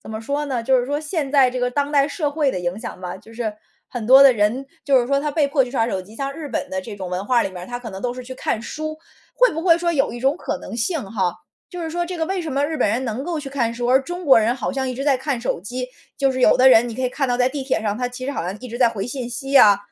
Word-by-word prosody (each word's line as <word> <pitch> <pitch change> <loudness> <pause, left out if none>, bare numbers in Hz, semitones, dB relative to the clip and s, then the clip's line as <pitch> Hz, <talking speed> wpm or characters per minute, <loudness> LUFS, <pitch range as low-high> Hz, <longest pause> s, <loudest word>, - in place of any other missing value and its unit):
怎 - - -10
么 220 - -5
说 285 +6 -2
呢 250 -4 -2
就 260 +2 +3
是 245 - -4
说 290 +1 -1
现 305 -2 -3
在 270 -3 +5
这 250 0 -4
个 245 - +1
当 285 +3 -1
代 280 0 +4
社 295 0 -2
会 295 -2 +1
的 185 - -3
影 175 +3 -3
响 220 -5 -7
吧。 180 -1 -5
就 225 +4 -16
是 225 -2 -2 0.4
很 240 -4 -5
多 265 +3 +9
的 275 - +8
人 225 +4 0 0.2
就 270 -3 +4
是 240 - -2
说 275 - +2
他 300 - -2
被 290 -1 +1
迫 280 -2 +3
去 245 - -9
刷 230 -3 +1
手 190 -5 -2
机。 205 +4 -15
像 275 +1 -3
日 315 0 -7
本 235 - -3
的 190 0 -2
这 210 +3 -8
种 185 -2 -6
文 180 +2 -3
化 240 0 +3
里 195 - -3
面 180 -1 -8
儿， - - -8
他 245 0 -5
可 235 -2 -7
能 190 -1 -8
都 245 -1 -2
是 255 - -7
去 260 - -8
看 220 - -2
书。 310 +3 -5 0.4
会 - - +4
不 325 - -3
会 335 -3 +5
说 340 0 0
有 275 -7 +1
一 240 - -7
种 270 +5 +2
可 - - -4
能 - - -8
性 275 +6 -1
哈， 185 -5 0 0.4
就 360 -1 -7
是 325 - -4
说 345 +2 -1
这 360 +1 -5
个 320 - 0
为 380 +1 -2
什 315 -4 -4
么 280 +2 +1
日 315 +1 -3
本 - - +2
人 235 +5 0
能 235 +2 -3
够 340 -2 -2
去 280 - -7
看 240 -4 -1
书， 240 +1 -3
而 260 +2 +5
中 350 +4 -6
国 265 -4 +7
人 225 +3 +1
好 250 +1 -3
像 265 -1 -2
一 255 - -3
直 265 - -4
在 280 -2 +3
看 265 -1 -2
手 235 - -2
机。 250 +6 -5 0.3
就 275 -1 +2
是 260 - -3
有 - - +5
的 255 +1 +7
人 240 -1 +6
你 230 - -6
可 260 - -4
以 255 - +1
看 270 +1 -2
到 245 - +1
在 250 0 +3
地 275 0 -4
铁 260 -4 0
上 210 -1 -1
他 250 -1 -1
其 250 +1 -8
实 - - -1
好 - - -3
像 185 +3 -4
一 255 - -8
直 240 +1 -6
在 245 -2 +5
回 205 -4 -4
信 250 -1 -5
息 270 +3 -1
啊， 205 -1 +7
255 Hz, 360 characters per minute, -21 LUFS, 230-285 Hz, 0.4 s, 多